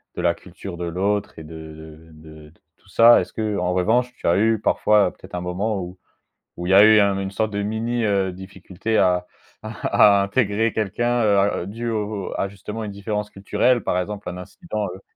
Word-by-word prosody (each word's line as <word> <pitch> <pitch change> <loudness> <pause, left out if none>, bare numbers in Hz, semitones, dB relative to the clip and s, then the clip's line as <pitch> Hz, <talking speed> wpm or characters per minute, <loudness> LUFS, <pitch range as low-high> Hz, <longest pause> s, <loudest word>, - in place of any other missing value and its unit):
de - - -3
la 85 -1 +2
culture 90 0 -10
de 90 - -5
l'autre 95 +2 -2
et - - -9
de 80 0 -11
de 80 0 -15 0.2
de - - -26 0.2
tout - - -29
ça. 115 +1 +6
Est-ce - - -5
que, 110 -2 -2
en 90 -1 -1
revanche, 120 +7 +1
tu - - -6
as 85 - +3
eu 110 +1 +2
parfois 105 -3 +3
peut-être - - -16
un 90 - -3
moment 95 +4 -2
où 90 +1 -8 0.6
où 90 - -5
il - - -2
y - - +3
a 100 +1 +8
eu 110 0 +7
un 100 -1 +1
une 95 0 -4
sorte 110 +2 -1
de 100 - -2
mini, 115 +3 -2
heu, 100 -2 +1
difficulté 95 +3 -5
à 90 -1 +2 0.3
à 100 -1 +3
à - - +1
intégrer 105 +1 0
quelqu'un, 120 +4 -1
heu, 105 -2 +3
à 100 -3 +1
dû 115 +4 -5
au 105 -3 -3
à 100 - -1
justement 105 +2 -7
une 105 - -6
différence 105 +1 -4
culturelle? 115 +4 0
Par - - 0
exemple, 100 +1 -5
un 90 - -7
incident, 105 - -5
heu 95 - -14
100 Hz, 215 wpm, -22 LUFS, 90-110 Hz, 0.6 s, a